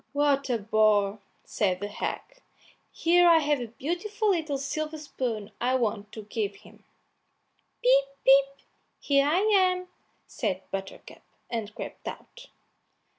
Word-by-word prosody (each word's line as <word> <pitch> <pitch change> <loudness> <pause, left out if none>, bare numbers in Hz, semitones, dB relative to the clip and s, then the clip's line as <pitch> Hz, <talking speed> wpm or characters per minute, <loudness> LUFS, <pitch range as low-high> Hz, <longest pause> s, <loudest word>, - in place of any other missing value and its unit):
"What 285 -1 +1
a 245 - +2
bore!" 210 -1 +2 0.2
said 185 -4 -1
the 205 - -4
hag; 205 - -3 0.7
"here 350 +1 +4
I 335 -1 +7
have 295 -2 +1
a 240 - -4
beautiful 355 - -2
little 315 -6 -1
silver 310 +3 -3
spoon 235 -8 -4
I 250 +2 +2
want 215 -4 -1
to 220 - -7
give 210 -1 -3
him." - - -18 1.0
"Pip, 270 +2 +5 0.2
pip! 275 +1 +4 0.3
here 280 -1 +2
I 335 +6 +3
am," 370 -3 +2 0.4
said 190 -5 -3
Buttercup, 195 0 -7 0.3
and 220 -3 -4
crept - - -8
out. - - -9
270 Hz, 130 wpm, -27 LUFS, 215-315 Hz, 1.0 s, I